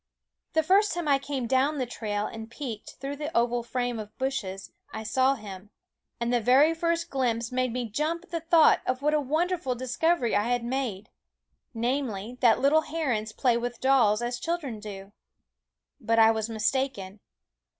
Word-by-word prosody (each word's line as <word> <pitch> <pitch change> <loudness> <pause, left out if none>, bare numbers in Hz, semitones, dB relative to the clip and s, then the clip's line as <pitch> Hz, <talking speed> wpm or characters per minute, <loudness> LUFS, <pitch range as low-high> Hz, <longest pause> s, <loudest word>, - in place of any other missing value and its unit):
The 320 - +3
first 390 +5 +3
time 345 -3 -3
I 280 -1 +4
came 275 -2 -3
down 265 +5 +2
the 260 - -1
trail 210 -3 -3
and 225 0 -7
peeked 230 -4 -7
through 280 +1 -5
the 300 +1 -4
oval 240 +1 +2
frame 245 0 -2
of 210 -1 -9
bushes, 200 -9 -3 0.2
I 220 +1 -6
saw 260 +5 +2
him; 205 -4 -10 0.5
and 235 +1 -1
the 240 - +2
very 270 +8 +5
first 335 0 -1
glimpse 235 -3 -1
made 255 -1 0
me 245 0 -3
jump 310 - -2
at 370 - -21
the 335 - -1
thought 325 0 +5
of 255 +1 -1
what 300 +1 +2
a 305 - +2
wonderful 310 -1 -1
discovery 255 +2 0
I 205 +1 +2
had 245 0 0
made, 240 -5 -3 0.7
namely, 240 -2 -2
that 235 -2 +5
little 285 +4 +4
herons 270 -9 -2
play 240 +1 +1
with 240 0 -4
dolls, 240 -5 +3
as 240 0 -2
children 315 -10 -3
do. 200 -2 -9 0.9
But 230 -2 0
I 225 0 +7
was 220 0 -2
mistaken. 220 -3 -2
250 Hz, 175 wpm, -27 LUFS, 225-285 Hz, 0.9 s, I